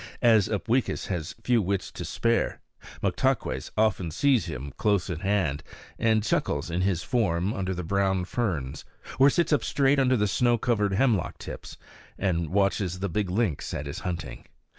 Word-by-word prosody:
As 110 -4 +5
Upweekis 110 +5 -1
has 90 +1 -3
few 120 -1 +3
wits 100 0 -2
to - - -7
spare, 115 0 0 0.4
Moktaques - - 0
often 105 -5 +2
sees 130 - +2
him 70 -3 -6
close 100 -4 +1
at 80 -1 -4
hand, 95 -8 0 0.4
and 110 -2 +3
chuckles 85 - -1
in 85 +2 0
his 95 -3 0
form 100 -5 0
under 95 -1 -2
the 90 - -4
brown 95 +1 +1
ferns, 80 - -2 0.4
or 135 +1 +8
sits 170 +2 +1
up 145 - +2
straight 140 0 +2
under 130 -1 +3
the 105 -1 +2
snow 120 +4 +2
covered 105 -4 +1
hemlock 110 -3 +1
tips, - - -8 0.4
and 85 -4 0
watches 95 -1 +1
the 100 +1 -2
big 100 +2 -1
lynx 95 -6 -1
at 75 - -4
his 70 - -5
hunting. 80 -8 -5
100 Hz, 165 wpm, -27 LUFS, 90-115 Hz, 0.4 s, or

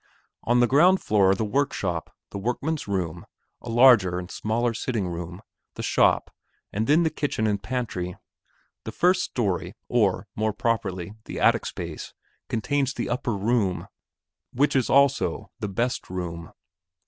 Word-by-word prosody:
On 120 +1 +3
the 120 - +5
ground 175 +9 +5
floor 100 -3 +3
are 95 - +4
the 110 - -1
workshop, 105 - -1 0.2
the 100 - -5
workmen's 135 +8 -2
room, 90 -5 -2 0.4
a 120 - -8
larger 115 -7 +6
and 90 0 -6
a - - -9
smaller 115 +2 0
sitting 110 -4 -2
room, 85 +3 -6 0.3
the - - -5
shop, - - +2 0.4
and 110 +2 -1
then 155 +4 +4
the 160 - +1
kitchen 145 -7 -1
and 100 -2 0
pantry; 110 -9 -3 0.7
the - - -5
first 180 +1 +3
story 95 -4 -2
or, 100 -5 +1
more 110 0 0
properly, 100 -5 -2
the - - -6
attic - - +3
space, - - -7 0.3
contains 135 +4 0
the - - -3
"upper 120 -3 -1
room" 105 -3 0 0.6
which 140 +4 +1
is 130 -3 +2
also 140 -2 +2
the 105 - -3
"best 120 +6 -2
room." 85 -2 -5
110 Hz, 155 wpm, -25 LUFS, 95-130 Hz, 0.7 s, larger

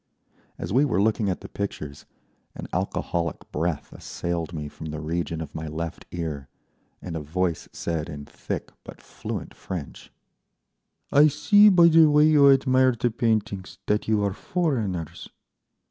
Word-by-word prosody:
As - - -5
we 135 +4 +5
were 120 -9 +1
looking 105 0 +2
at 90 - -3
the - - -8
pictures 75 -8 -6 0.5
an - - -7
alcoholic 85 -1 -2
breath 80 0 -2
assailed 85 -1 -4
me 75 -3 -5
from 80 +2 -9
the 75 0 -5
region 80 +1 -3
of 80 - -7
my 80 0 -5
left 80 +2 -5
ear, 75 -6 -5 0.5
and 85 -2 -5
a - - -2
voice 85 +2 -2
said 80 -2 -3
in 75 -1 -7
thick - - -6
but - - -11
fluent - - -7
French, 85 -7 -7 1.0
"I 145 +2 +7
see, 205 +8 +6
by 175 -3 +7
the 160 -1 +7
way 150 0 +5
you 150 -2 +6
admire 130 -2 +4
the 120 0 +1
paintings, 110 -5 -1
that 105 +1 0
you 110 -2 +2
are 100 -1 0
foreigners." 95 - -2
95 Hz, 155 wpm, -25 LUFS, 80-130 Hz, 1.0 s, I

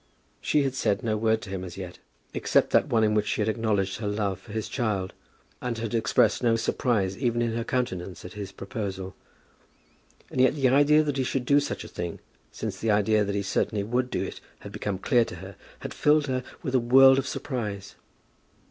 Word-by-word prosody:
She 150 - +2
had 135 -2 -1
said 105 -6 0
no 110 -2 0
word 110 +1 +1
to 95 - -8
him 95 -1 -4
as 90 -1 -8
yet, 90 -2 -7 0.3
except - - +2
that - - +4
one 110 -1 +2
in 105 0 +3
which 105 -1 +1
she - - -1
had 105 - +1
acknowledged 105 -4 0
her 105 - -3
love 100 -2 -1
for 110 - -14
his 110 0 -3
child, 105 -7 -2 0.5
and 120 -2 -3
had 115 -1 -4
expressed 110 -1 +2
no 115 -2 +3
surprise, 110 -4 0
even 120 -3 0
in 120 -1 0
her 115 0 -2
countenance, 95 -9 -3
at 90 - -8
his 100 -2 -6
proposal. 95 -2 -5 1.2
And 130 - +1
yet 130 +3 +4
the 135 -3 +3
idea 145 +3 +5
that 145 -2 -2
he 135 - +1
should 130 0 -2
do 140 +3 +5
such 145 - -4
a - - -9
thing, 85 -1 -5 0.3
since - - -5
the 115 - -1
idea 105 0 +3
that 100 0 -2
he 100 - -1
certainly 100 +1 0
would 125 +4 -1
do - - -1
it - - -7 0.2
had - - -9
become 100 -2 -3
clear 120 +5 +3
to 100 - -8
her, 95 +2 -10 0.3
had - - -6
filled 150 0 +3
her 130 -2 -2 0.2
with 130 - -3
a 130 - +4
world 130 +3 +7
of 135 - -3
surprise. 105 -9 -4
110 Hz, 215 wpm, -26 LUFS, 100-125 Hz, 1.2 s, world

